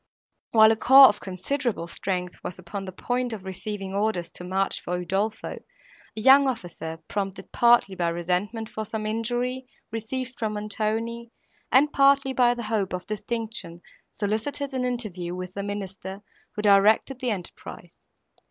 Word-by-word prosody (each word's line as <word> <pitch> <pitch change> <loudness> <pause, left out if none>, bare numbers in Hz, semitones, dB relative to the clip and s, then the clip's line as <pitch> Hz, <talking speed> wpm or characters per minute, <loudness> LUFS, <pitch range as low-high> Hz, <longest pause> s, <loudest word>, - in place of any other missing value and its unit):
While 220 -1 +7
a - - +3
corps 265 +4 +9
of 205 - -3
considerable 195 +1 -3
strength 180 0 -3
was 180 - -5
upon 185 +2 -6
the 185 - -6
point 245 +5 -2
of 205 -4 -7
receiving 190 +1 -5
orders 200 -4 -1
to - - -9
march 190 +2 -1
for 180 +1 -3
Udolpho, 200 +5 -2
a - - -15
young 270 +4 +7
officer, 175 -9 -4
prompted 195 -1 -4
partly 235 -5 +4
by 175 -2 -1
resentment, 180 +7 -2
for 220 - -5
some 215 0 -4
injury, 245 +4 -2 0.2
received 245 +3 -4
from 220 -2 -1
Montoni, 220 +3 -2 0.4
and 290 +4 +5
partly 275 -1 +4
by 245 -2 +4
the 240 - -5
hope 210 -4 -1
of 180 0 -4
distinction, 215 -5 -4 0.3
solicited 225 +7 -2
an 255 -1 -1
interview 195 -8 -3
with 185 0 -6
the 200 - -4
Minister, 195 -1 -6 0.3
who 210 - -3
directed 210 +6 +4
the 255 - -1
enterprise. 190 -6 -7
215 Hz, 150 wpm, -25 LUFS, 190-240 Hz, 0.4 s, corps